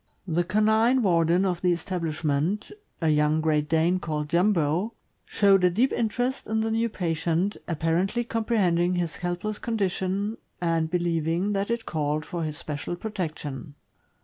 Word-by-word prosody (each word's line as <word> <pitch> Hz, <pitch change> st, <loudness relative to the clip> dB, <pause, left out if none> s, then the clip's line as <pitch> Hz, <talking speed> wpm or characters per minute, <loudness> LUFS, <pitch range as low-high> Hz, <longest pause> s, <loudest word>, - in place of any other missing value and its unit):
The 175 Hz, +1 st, +1 dB
canine 220 Hz, +6 st, +3 dB
warden 170 Hz, 0 st, +3 dB
of 180 Hz, -2 st, -1 dB
the 180 Hz, -, +3 dB
establishment 165 Hz, 0 st, -1 dB
— -, -, -41 dB
a 160 Hz, -, +3 dB
young 150 Hz, +1 st, +3 dB
Great 150 Hz, -1 st, +1 dB
Dane, 165 Hz, +3 st, +2 dB
called 150 Hz, -3 st, -3 dB
Jumbo 175 Hz, +3 st, +1 dB
— -, -, -46 dB
showed 195 Hz, -2 st, +4 dB
a 180 Hz, -, +6 dB
deep 230 Hz, +9 st, +1 dB
interest 245 Hz, +3 st, -1 dB
in 220 Hz, 0 st, 0 dB
the 225 Hz, 0 st, -1 dB
new 230 Hz, +1 st, +1 dB
patient, 170 Hz, 0 st, -1 dB
apparently 170 Hz, +8 st, 0 dB
comprehending 195 Hz, -7 st, +1 dB
his 175 Hz, -3 st, -2 dB
helpless 180 Hz, +4 st, -3 dB
condition, 200 Hz, -1 st, -1 dB, 0.2 s
and 165 Hz, -2 st, 0 dB
believing 170 Hz, +2 st, 0 dB
that 200 Hz, +1 st, -1 dB
it 235 Hz, -1 st, -2 dB
called 155 Hz, -1 st, -1 dB
for 170 Hz, +2 st, -4 dB
his 155 Hz, -1 st, -3 dB
special 150 Hz, +1 st, -4 dB
protection. 155 Hz, -, -5 dB
175 Hz, 150 wpm, -26 LUFS, 160-210 Hz, 0.2 s, a